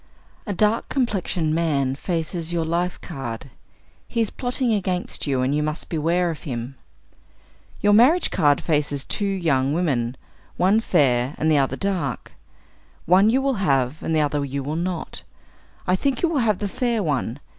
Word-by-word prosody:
A - - -1
dark 215 +4 +1
complexioned 190 - 0
man 145 -5 +1
faces 165 +2 -3
your 170 -2 0
life 175 +2 -1
card. 135 -5 -6 0.6
He 235 - -3
is 225 -3 +1
plotting 245 -1 -1
against 185 -5 -2
you, 135 -2 +1
and 130 +2 +1
you 150 - +1
must 155 +2 -3
beware 170 +2 +1
of 160 - -8
him. 125 -2 -5 1.1
Your 205 0 +4
marriage 270 +11 +5
card 145 -5 +3
faces 145 -3 0
two 205 - -3
young 150 -8 +1
women, 130 -8 0 0.4
one 195 +5 +4
fair 135 - +2
and 160 +1 +1
the 150 - +4
other 135 - +1
dark. 180 -10 -3 0.7
One 190 +5 +5
you 260 +4 +2
will 265 -7 0
have, 135 -3 +1
and 160 - -1
the 155 - +3
other 145 -1 0
you 140 0 -3
will 145 +3 -3
not. 175 0 -3 0.6
I 180 - +3
think 265 - -1
you 340 - +4
will 315 -4 0
have 215 -5 +2
the 205 - -2
fair 235 +1 -1
one. 140 -5 -1
165 Hz, 170 wpm, -23 LUFS, 140-200 Hz, 1.1 s, marriage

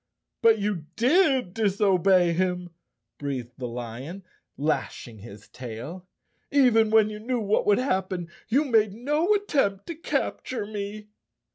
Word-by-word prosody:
" - - -59
But 225 -2 +6
you 200 -7 -2
did 265 - +3
disobey 195 -4 +3
him," 180 0 -1 0.5
breathed 130 -4 -4
the 125 - -3
lion, 125 - -7 0.3
lash¬ 150 -2 -2
ing 110 -3 -12
his 105 0 -12
tail. 130 +10 -8 0.4
"Even 245 -6 +4
when 215 -1 +4
you 210 - -7
knew 245 +3 -2
what 210 -1 0
would 205 - +5
hap¬ 190 -8 0
pen, 175 -3 -4 0.2
you 275 +7 +2
made 220 -6 +3
no 295 - 0
attempt 240 - 0
to 335 - -5
capture 255 - -3
me!" 210 0 -6
200 Hz, 145 wpm, -26 LUFS, 170-230 Hz, 0.5 s, But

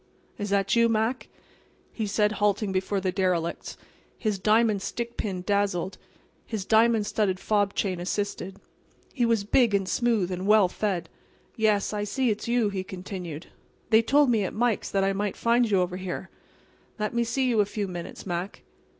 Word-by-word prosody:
"Is 205 0 -3
that 200 +1 +2
you, 230 0 +4
Mac?" 225 +3 0 0.7
he 220 -2 -2
said, 210 +1 +2
halting 205 -1 0
before 190 +1 -1
the 185 -1 -1
derelicts. 180 -3 -1 0.4
His 210 -4 -1
diamond 215 0 +3
stickpin 215 -5 -4
dazzled. 200 -2 0 0.4
His 215 -4 -5
diamond 225 0 +4
studded 205 -3 0
fob 205 -1 +1
chain 185 -3 -1
assisted. 195 +1 -3 0.5
He 240 -4 +1
was 225 -3 +2
big 220 +1 +3
and 195 -1 0
smooth 225 -5 +1
and 185 +2 -3
well 210 -2 +6
fed. 190 -1 -2 0.5
"Yes, 215 -3 +1
I 205 0 -1
see 245 +3 0
it's 210 - -4
you," 235 -3 +2
he 195 -2 -3
continued. 180 -4 -7 0.4
"They 220 +1 +7
told 275 +3 +4
me 220 -3 +2
at 185 - -4
Mike's 235 -1 0
that 195 -1 +1
I 195 0 +2
might 200 0 -2
find 235 0 +2
you 195 -3 +3
over 180 0 -2
here. 190 0 -5 0.7
Let 210 0 -2
me 235 0 +2
see 255 +3 0
you 235 -3 +2
a 205 - +5
few 205 -1 -3
minutes, 175 -1 -7
Mac." 180 +1 -4
205 Hz, 175 wpm, -26 LUFS, 190-225 Hz, 0.7 s, They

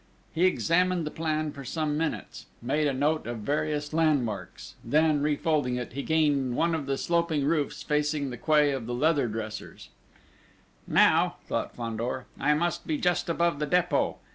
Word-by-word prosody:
He 170 +3 +2
examined 180 -1 +2
the 150 - -4
plan 155 -1 -2
for 140 -1 -9
some 155 +2 -2
minutes; 160 +1 -4
made 145 +5 0
a - - +1
note 150 +3 0
of 120 -1 -4
various 150 +3 -2
landmarks; 145 -10 -1
then 155 -1 +2
refolding 145 -3 +1
it, 125 -1 -5
he 140 - -3
gained 145 -5 +1
one 170 +4 +1
of 155 -4 -2
the 135 0 0
sloping 170 -4 0
roofs 150 -1 -1
facing 150 -2 0
the 125 - -6
quay 150 +2 +3
of 130 -4 -4
the 120 - -2
Leather 145 -1 +2
Dressers: 110 -1 -7 1.0
"Now," - - +4
thought - - -3
Fandor, 120 +2 -3
"I 150 +2 +3
must 170 +2 -1
be 155 - 0
just 175 +1 0
above 170 -2 +1
the 150 - -1
Dépôt! 180 +2 +1
150 Hz, 165 wpm, -27 LUFS, 135-160 Hz, 1.0 s, Now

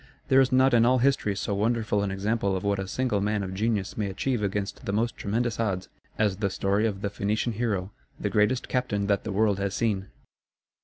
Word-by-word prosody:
There 135 0 +6
is 130 - +2
not 130 0 +4
in 115 -1 +5
all 125 +2 +4
history 125 -5 +2
so 100 - -2
wonderful 110 0 +1
an 100 - -1
example 100 +1 0
of 90 - -6
what 100 -1 0
a 95 - -3
single 120 -1 0
man 105 0 0
of 95 -1 -5
genius 105 -1 -1
may 105 -2 -1
achieve 120 +4 -1
against 100 0 -3
the - - -1
most 115 +3 0
tremendous 115 +3 -1
odds, 95 -5 -1 0.3
as 105 -3 +1
the 100 -1 0
story 100 +3 +1
of 100 -3 -4
the 100 - -1
Phoenician 105 +3 -1
hero 105 -4 -2 0.3
the - - -2
greatest 105 +5 +2
captain 115 -6 -1
that 100 -1 0
the 110 - -3
world 100 0 +2
has 100 0 -2
seen. 105 -4 0
105 Hz, 215 wpm, -27 LUFS, 100-115 Hz, 0.3 s, There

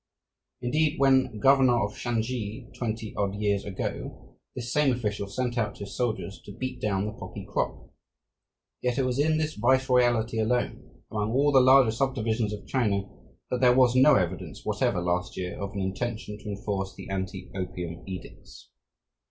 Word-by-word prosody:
Indeed, 150 +5 +1
when 130 -4 +4
governor 130 0 +5
of 105 - -7
Shansi, 115 0 -3
twenty 110 -2 -3
odd 100 -1 -1
years 100 -1 0
ago, 95 -2 -6 0.2
this 125 -1 -4
same 150 -2 +4
official 105 -5 -2
sent 120 +4 -2
out 105 -3 -1
his 100 - -7
soldiers 110 -7 -2
to - - -8
beat 130 -1 -5
down 100 -3 0
the 105 - -3
poppy - - -8
crop. - - -3 0.9
Yet 125 -1 0
it 135 - +2
was 125 +1 -1
in 155 +2 +3
this 155 -1 -1
viceroyalty 120 -2 +2
alone, 120 +3 -2
among 105 +1 -1
all 145 +3 +4
the 135 -2 +7
larger 130 -2 +6
subdivisions 115 -3 0
of 105 -1 -6
China, 105 -7 +1 0.5
that 125 - 0
there 125 -1 +6
was 125 -1 +5
no 130 +4 +7
evidence 90 -2 -2
whatever - - +1
last 90 +1 -1
year 90 -1 -3
of 100 0 -3
an 100 - -3
intention 105 +2 -3
to 105 - -8
enforce 100 -2 -3
the - - -9
anti 95 0 -4
opium 90 -3 -5
edicts. 95 -1 -10
115 Hz, 165 wpm, -27 LUFS, 100-130 Hz, 0.9 s, the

